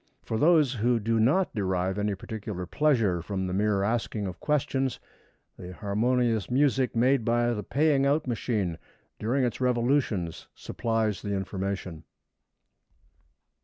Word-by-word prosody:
For 110 Hz, -, -2 dB
those 155 Hz, -4 st, +4 dB
who 120 Hz, 0 st, +1 dB
do 115 Hz, +1 st, 0 dB
not 150 Hz, +12 st, +2 dB
derive 95 Hz, -1 st, -1 dB
any 105 Hz, -1 st, 0 dB
particular 100 Hz, -2 st, -6 dB
pleasure 115 Hz, -, +1 dB
from 95 Hz, +2 st, -3 dB
the 90 Hz, -, -3 dB
mere 100 Hz, 0 st, +1 dB
asking 110 Hz, -1 st, -1 dB
of 90 Hz, -2 st, -6 dB
questions, 135 Hz, -3 st, 0 dB, 0.6 s
the 90 Hz, 0 st, -8 dB
harmonious 110 Hz, +2 st, 0 dB
music 130 Hz, -1 st, +2 dB
made 125 Hz, +2 st, +3 dB
by 120 Hz, +1 st, +1 dB
the 105 Hz, -, -3 dB
paying 140 Hz, +5 st, +2 dB
out 150 Hz, +2 st, +1 dB
machine 105 Hz, -8 st, -2 dB, 0.4 s
during 130 Hz, +5 st, 0 dB
its 120 Hz, 0 st, -2 dB
revolutions 120 Hz, -, 0 dB
supplies 110 Hz, -3 st, -2 dB
the 100 Hz, -1 st, -2 dB
information. 95 Hz, -3 st, -4 dB
115 Hz, 130 wpm, -27 LUFS, 100-125 Hz, 0.6 s, those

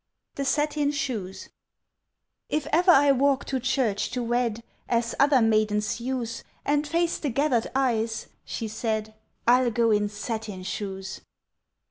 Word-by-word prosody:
THE 275 Hz, -, -3 dB
SATIN 295 Hz, +1 st, +1 dB
SHOES 245 Hz, -11 st, -4 dB, 1.0 s
"IF 300 Hz, -2 st, -1 dB
ever 355 Hz, +4 st, +4 dB
I 285 Hz, -4 st, +7 dB
walk 275 Hz, 0 st, +2 dB
to 265 Hz, -, -1 dB
church 240 Hz, -5 st, 0 dB
to 250 Hz, -1 st, -3 dB
wed, 235 Hz, -1 st, 0 dB, 0.3 s
As 235 Hz, 0 st, +1 dB
other 275 Hz, -4 st, +5 dB
maidens 215 Hz, -1 st, +1 dB
use, 240 Hz, -2 st, -3 dB, 0.2 s
And 295 Hz, +1 st, +1 dB
face 335 Hz, +2 st, 0 dB
the 290 Hz, -, -2 dB
gathered 260 Hz, -2 st, +1 dB
eyes," 230 Hz, -4 st, 0 dB, 0.2 s
she 225 Hz, -, -4 dB
said, 220 Hz, 0 st, -2 dB, 0.3 s
"I'll 245 Hz, +1 st, +5 dB
go 230 Hz, 0 st, +2 dB
in 210 Hz, -1 st, +2 dB
satin 210 Hz, -2 st, -5 dB
shoes!" 190 Hz, -1 st, -5 dB
240 Hz, 135 wpm, -26 LUFS, 220-275 Hz, 1.0 s, I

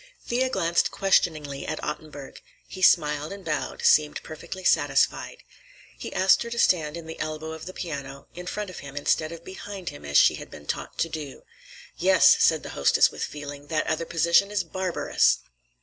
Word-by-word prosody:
Thea 255 Hz, +2 st, 0 dB
glanced 170 Hz, -8 st, +1 dB
questioningly 155 Hz, -7 st, 0 dB
at -, -, -3 dB
Ottenburg. 150 Hz, -2 st, -7 dB, 0.3 s
He 185 Hz, -, -9 dB
smiled 150 Hz, -3 st, +3 dB
and 200 Hz, -1 st, -9 dB
bowed, 150 Hz, -4 st, -3 dB
seemed 150 Hz, -1 st, +4 dB
perfectly 175 Hz, +4 st, -8 dB
satisfied. -, -, +1 dB, 0.5 s
He -, -, -7 dB
asked 190 Hz, +1 st, +4 dB
her 235 Hz, -, -4 dB
to 235 Hz, -, -5 dB
stand 160 Hz, -7 st, +2 dB
in 170 Hz, -, -8 dB
the 160 Hz, 0 st, -9 dB
elbow 155 Hz, 0 st, -4 dB
of 160 Hz, +2 st, -8 dB
the -, -, -5 dB
piano, 140 Hz, -6 st, -6 dB
in 180 Hz, +1 st, -9 dB
front 210 Hz, 0 st, -4 dB
of -, -, -9 dB
him, 140 Hz, 0 st, -10 dB
instead 155 Hz, +2 st, 0 dB
of 170 Hz, 0 st, -10 dB
behind 190 Hz, -1 st, -7 dB
him 70 Hz, -, -11 dB
as 70 Hz, 0 st, +1 dB
she -, -, +6 dB
had -, -, -10 dB
been 75 Hz, -, -12 dB
taught -, -, -5 dB
to 165 Hz, -, 0 dB
do. 150 Hz, -4 st, -7 dB, 0.5 s
"Yes," -, -, +6 dB
said -, -, +3 dB
the -, -, -7 dB
hostess 70 Hz, -, +3 dB
with -, -, -5 dB
feeling. 145 Hz, -1 st, -7 dB
"That 155 Hz, -1 st, -1 dB
other 160 Hz, +1 st, -1 dB
position 170 Hz, +4 st, +3 dB
is 205 Hz, -2 st, -1 dB
barbarous." 185 Hz, +1 st, +1 dB
160 Hz, 185 wpm, -25 LUFS, 150-185 Hz, 0.5 s, she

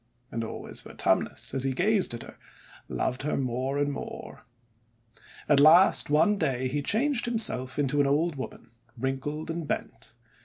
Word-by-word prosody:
And 115 Hz, -, -3 dB
always 110 Hz, -, -5 dB
Vertumnus, -, -, -1 dB
as 135 Hz, -1 st, +1 dB
he 135 Hz, -1 st, 0 dB
gazed 195 Hz, -, +2 dB
at 115 Hz, -, -8 dB
her, -, -, -14 dB, 0.5 s
loved 125 Hz, 0 st, -2 dB
her 150 Hz, -, -2 dB
more 130 Hz, +1 st, -2 dB
and 145 Hz, 0 st, 0 dB
more. -, -, -8 dB, 1.0 s
At 145 Hz, -2 st, +5 dB
last, 160 Hz, +5 st, +6 dB
one 200 Hz, +8 st, +3 dB
day, 130 Hz, -5 st, -1 dB
he 145 Hz, +3 st, -2 dB
changed 240 Hz, -, +1 dB
himself 210 Hz, -, 0 dB
into 145 Hz, 0 st, +1 dB
an 140 Hz, -, +1 dB
old 155 Hz, +3 st, +1 dB
woman, 130 Hz, -3 st, -9 dB, 0.3 s
wrinkled 135 Hz, +5 st, -3 dB
and 165 Hz, -2 st, -5 dB
bent. -, -, -5 dB
145 Hz, 155 wpm, -27 LUFS, 130-170 Hz, 1.0 s, last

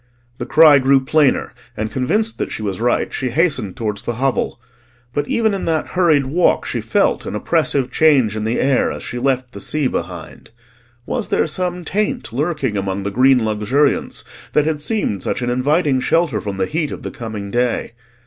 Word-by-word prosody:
The -, -, -4 dB
cry 155 Hz, -2 st, +7 dB
grew 135 Hz, 0 st, +3 dB
plainer, 150 Hz, -1 st, +2 dB, 0.2 s
and 110 Hz, 0 st, -3 dB
convinced 210 Hz, -, 0 dB
that -, -, -3 dB
she 110 Hz, -, -5 dB
was 100 Hz, 0 st, -3 dB
right 120 Hz, 0 st, 0 dB
she 130 Hz, -, -2 dB
hastened 140 Hz, -, 0 dB
towards 105 Hz, -3 st, -3 dB
the 120 Hz, -, -3 dB
hovel; 130 Hz, -1 st, -1 dB, 0.5 s
but 145 Hz, 0 st, -1 dB
even 220 Hz, -2 st, +1 dB
in 195 Hz, -, -3 dB
that 160 Hz, -2 st, -1 dB
hurried 160 Hz, -6 st, +3 dB
walk 165 Hz, +7 st, +2 dB
she -, -, -3 dB
felt -, -, 0 dB
an -, -, -4 dB
oppressive 135 Hz, -2 st, 0 dB
change 135 Hz, -10 st, +3 dB
in 110 Hz, -, -3 dB
the 110 Hz, +2 st, -1 dB
air 135 Hz, -1 st, +2 dB
as -, -, -7 dB
she 125 Hz, -, -5 dB
left 130 Hz, -1 st, 0 dB
the 100 Hz, -, -9 dB
sea 150 Hz, +6 st, -1 dB
behind. -, -, -5 dB, 0.6 s
Was -, -, -3 dB
there -, -, +1 dB
some 180 Hz, +2 st, -3 dB
taint 215 Hz, -, -2 dB
lurking 140 Hz, -5 st, -1 dB
amongst 95 Hz, 0 st, -2 dB
the 100 Hz, -, -3 dB
green 125 Hz, +1 st, +4 dB
luxuriance 110 Hz, +7 st, 0 dB, 0.3 s
that 150 Hz, -, +3 dB
had 155 Hz, -2 st, -1 dB
seemed 150 Hz, -, -1 dB
such -, -, -2 dB
an 120 Hz, -, 0 dB
inviting 140 Hz, +2 st, +1 dB
shelter 150 Hz, -4 st, +1 dB
from 100 Hz, -2 st, -5 dB
the 95 Hz, -, +1 dB
heat 155 Hz, -, -2 dB
of -, -, -7 dB
the -, -, -5 dB
coming 105 Hz, -4 st, -6 dB
day? 120 Hz, 0 st, 0 dB
135 Hz, 190 wpm, -19 LUFS, 115-155 Hz, 0.6 s, cry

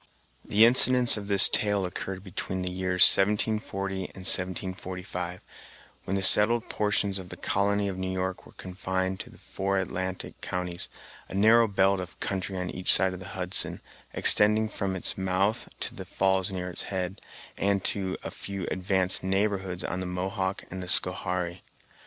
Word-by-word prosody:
The 110 Hz, +2 st, +4 dB
incidents 125 Hz, 0 st, +6 dB
of 105 Hz, -2 st, -7 dB
this 100 Hz, -1 st, +9 dB
tale 105 Hz, -4 st, 0 dB
occurred 95 Hz, +1 st, -6 dB
between 95 Hz, -1 st, -5 dB
the 90 Hz, -, -3 dB
years 90 Hz, 0 st, +5 dB
1740 100 Hz, -1 st, +3 dB
and 95 Hz, +1 st, -11 dB
1745, 90 Hz, -1 st, -2 dB, 0.6 s
when 95 Hz, -, -3 dB
the 95 Hz, -, +1 dB
settled 110 Hz, +4 st, +7 dB
portions 105 Hz, -2 st, -1 dB
of 90 Hz, -1 st, -11 dB
the -, -, -9 dB
colony 100 Hz, +1 st, 0 dB
of 95 Hz, -1 st, -5 dB
New 95 Hz, 0 st, -4 dB
York 95 Hz, 0 st, -4 dB
were -, -, -17 dB
confined 95 Hz, 0 st, -4 dB
to -, -, -8 dB
the -, -, -17 dB
four 95 Hz, 0 st, -4 dB
Atlantic 95 Hz, 0 st, -5 dB
counties, 90 Hz, -1 st, -4 dB, 0.4 s
a -, -, -8 dB
narrow 110 Hz, +3 st, +4 dB
belt 100 Hz, -1 st, +1 dB
of 90 Hz, -2 st, -9 dB
country 95 Hz, -2 st, -3 dB
on 90 Hz, 0 st, -4 dB
each 90 Hz, -, -1 dB
side 95 Hz, +1 st, +3 dB
of 90 Hz, -, -8 dB
the 95 Hz, -, -10 dB
Hudson, 90 Hz, 0 st, -2 dB, 0.3 s
extending 105 Hz, +1 st, +4 dB
from 95 Hz, -2 st, -4 dB
its 95 Hz, -, -2 dB
mouth 95 Hz, +5 st, -1 dB
to -, -, -3 dB
the -, -, -8 dB
falls 95 Hz, 0 st, -1 dB
near 90 Hz, -1 st, -5 dB
its -, -, -2 dB
head, 95 Hz, 0 st, -4 dB, 0.4 s
and 100 Hz, -1 st, 0 dB
to 95 Hz, -2 st, -2 dB
a -, -, -6 dB
few 100 Hz, -2 st, -7 dB
advanced 95 Hz, 0 st, -1 dB
"neighborhoods" 95 Hz, -2 st, -2 dB
on 90 Hz, -, -4 dB
the 95 Hz, -, -5 dB
Mohawk 95 Hz, +1 st, -4 dB
and 95 Hz, +1 st, -6 dB
the 90 Hz, -, -7 dB
Schoharie. 90 Hz, -1 st, -1 dB
95 Hz, 170 wpm, -26 LUFS, 90-100 Hz, 0.6 s, this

